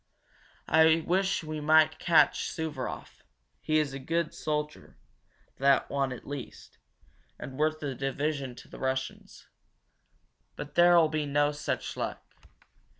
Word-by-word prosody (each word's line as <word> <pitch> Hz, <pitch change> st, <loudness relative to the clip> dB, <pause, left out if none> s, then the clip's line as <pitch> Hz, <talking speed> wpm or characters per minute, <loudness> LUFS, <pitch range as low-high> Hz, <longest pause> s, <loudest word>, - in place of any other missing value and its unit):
I 160 Hz, +1 st, +5 dB
wish 190 Hz, 0 st, +1 dB
we 155 Hz, -1 st, -5 dB
might 155 Hz, +1 st, +4 dB
catch 170 Hz, -2 st, +3 dB
Suvaroff 155 Hz, -7 st, -6 dB, 0.4 s
he 155 Hz, -, 0 dB
is 150 Hz, -3 st, 0 dB
a 135 Hz, -, -5 dB
good 165 Hz, +4 st, -2 dB
soldier, 150 Hz, -, -4 dB, 0.6 s
that 135 Hz, 0 st, +3 dB
one 135 Hz, -1 st, 0 dB
at 125 Hz, -, -8 dB
least, 140 Hz, -3 st, -9 dB, 0.6 s
and 130 Hz, +1 st, -8 dB
worth 155 Hz, 0 st, 0 dB
a 140 Hz, -2 st, -2 dB
division 135 Hz, 0 st, -3 dB
to -, -, -13 dB
the -, -, -12 dB
Russians. 130 Hz, 0 st, -4 dB, 1.1 s
But 145 Hz, -, -8 dB
there'll 175 Hz, -1 st, +6 dB
be 155 Hz, -1 st, -2 dB
no 145 Hz, +1 st, +2 dB
such 150 Hz, 0 st, -4 dB
luck. -, -, -4 dB
150 Hz, 130 wpm, -29 LUFS, 135-155 Hz, 1.1 s, there'll